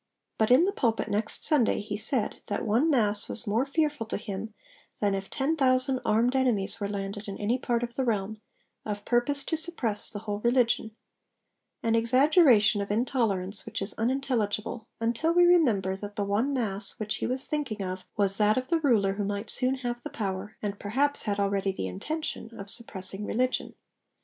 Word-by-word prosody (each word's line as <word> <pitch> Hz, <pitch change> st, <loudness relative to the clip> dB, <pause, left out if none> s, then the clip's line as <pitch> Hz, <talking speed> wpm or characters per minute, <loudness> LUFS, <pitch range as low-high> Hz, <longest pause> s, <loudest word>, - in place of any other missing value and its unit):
But 220 Hz, -, +3 dB
in 255 Hz, +8 st, +6 dB
the 395 Hz, -, +1 dB
pulpit 230 Hz, -, 0 dB
'next 210 Hz, +1 st, -1 dB
Sunday' 285 Hz, -7 st, +4 dB
he 205 Hz, 0 st, -5 dB
said 220 Hz, +2 st, +2 dB
that 205 Hz, -, -2 dB
'one 235 Hz, +9 st, +2 dB
Mass 210 Hz, -7 st, +1 dB
was 230 Hz, -, -4 dB
more 225 Hz, +6 st, 0 dB
fearful 295 Hz, -5 st, -1 dB
to -, -, -2 dB
him 205 Hz, +1 st, -6 dB, 0.5 s
than 205 Hz, -1 st, +1 dB
if 195 Hz, 0 st, -4 dB
ten 290 Hz, +4 st, 0 dB
thousand 260 Hz, -2 st, +2 dB
armed 235 Hz, +4 st, +2 dB
enemies 230 Hz, -5 st, +1 dB
were 200 Hz, -1 st, -2 dB
landed 200 Hz, +1 st, -5 dB
in 195 Hz, -, -5 dB
any 230 Hz, +5 st, 0 dB
part 240 Hz, -1 st, -1 dB
of 240 Hz, 0 st, -5 dB
the 265 Hz, -, 0 dB
realm, 215 Hz, -2 st, -2 dB, 0.4 s
of 205 Hz, -1 st, -5 dB
purpose 260 Hz, +4 st, +1 dB
to 325 Hz, -, -1 dB
suppress 310 Hz, -10 st, 0 dB
the -, -, -6 dB
whole 205 Hz, -2 st, -4 dB
religion' 235 Hz, -2 st, +1 dB, 0.9 s
an 225 Hz, -, +1 dB
exaggeration 235 Hz, -, +4 dB
of 200 Hz, -, -4 dB
intolerance 205 Hz, -4 st, 0 dB
which 225 Hz, 0 st, -5 dB
is 195 Hz, +2 st, -2 dB
unintelligible, 230 Hz, -3 st, -1 dB
until 235 Hz, +9 st, 0 dB
we 355 Hz, 0 st, +6 dB
remember 230 Hz, -, +3 dB
that 205 Hz, +1 st, -8 dB
the 205 Hz, -, -1 dB
'one 210 Hz, +8 st, 0 dB
mass' 205 Hz, -6 st, -2 dB
which 215 Hz, -1 st, -2 dB
he -, -, -2 dB
was 255 Hz, +2 st, +1 dB
thinking 255 Hz, -9 st, -2 dB
of 185 Hz, 0 st, -5 dB
was 195 Hz, -1 st, +5 dB
that 210 Hz, +2 st, +4 dB
of 255 Hz, 0 st, -2 dB
the 335 Hz, -1 st, +2 dB
ruler 220 Hz, -10 st, +2 dB
who 205 Hz, +1 st, -3 dB
might 205 Hz, +2 st, -3 dB
soon 255 Hz, +1 st, +1 dB
have 240 Hz, -2 st, -4 dB
the -, -, -6 dB
power, 200 Hz, 0 st, -4 dB
and 200 Hz, -1 st, -3 dB
perhaps 275 Hz, +8 st, 0 dB
had 205 Hz, -2 st, -2 dB
already 200 Hz, -1 st, +1 dB
the 190 Hz, -, -4 dB
intention, 305 Hz, -, -4 dB
of 200 Hz, 0 st, -6 dB
suppressing 195 Hz, -4 st, -4 dB
religion. 255 Hz, +4 st, -1 dB
225 Hz, 190 wpm, -28 LUFS, 205-255 Hz, 0.9 s, in